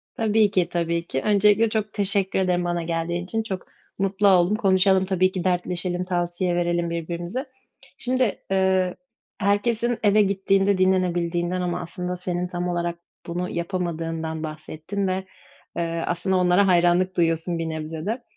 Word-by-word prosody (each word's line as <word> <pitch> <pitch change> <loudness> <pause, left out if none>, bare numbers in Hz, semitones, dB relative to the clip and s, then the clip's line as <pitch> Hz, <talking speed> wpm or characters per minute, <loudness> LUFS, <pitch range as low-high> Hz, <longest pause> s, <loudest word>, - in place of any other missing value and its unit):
Tabii 215 -2 +3
ki, 180 -3 +1
tabii 170 0 -1
ki. 135 - -2
Öncelikle 210 +2 +4
çok 215 -1 -2
teşekkür 200 -2 0
ederim. 180 -1 +1
Bana 175 -1 -1
geldiğin 170 +1 -2
için 225 +5 -2
çok 190 -4 -4 0.4
mutlu 195 +1 +2
oldum, 185 +1 +4
konuşalım. 190 -2 +3
Tabii 185 0 +2
ki 185 -2 -3
dertleşelim, 180 0 -1
tavsiye 175 0 -1
verelim 175 -1 0
birbirimize. 170 - -4 0.5
Şimdi, 255 -3 +1
ııı, 190 -1 +2 0.4
herkesin 225 +4 +1
eve 210 +1 +5
gittiğinde 195 0 +2
dinlenebildiğinden 180 -1 +1
ama 180 0 -2
aslında, 180 +1 -4
senin 180 0 -2
tam 180 0 -3
olarak 175 -1 -2 0.3
bunu 175 +1 -3
yapamadığından 165 -3 -3
bahsettin 155 +5 -4
ve, 190 +1 -2 0.5
eee, 165 -1 -2
aslında, 185 +2 0
onlara 180 +2 +4
hayranlık 180 +1 +3
duyuyorsun 165 0 +2
bir 165 -1 -2
nebze 160 0 -5
de. 235 +4 -3
180 Hz, 145 wpm, -24 LUFS, 170-195 Hz, 0.5 s, eve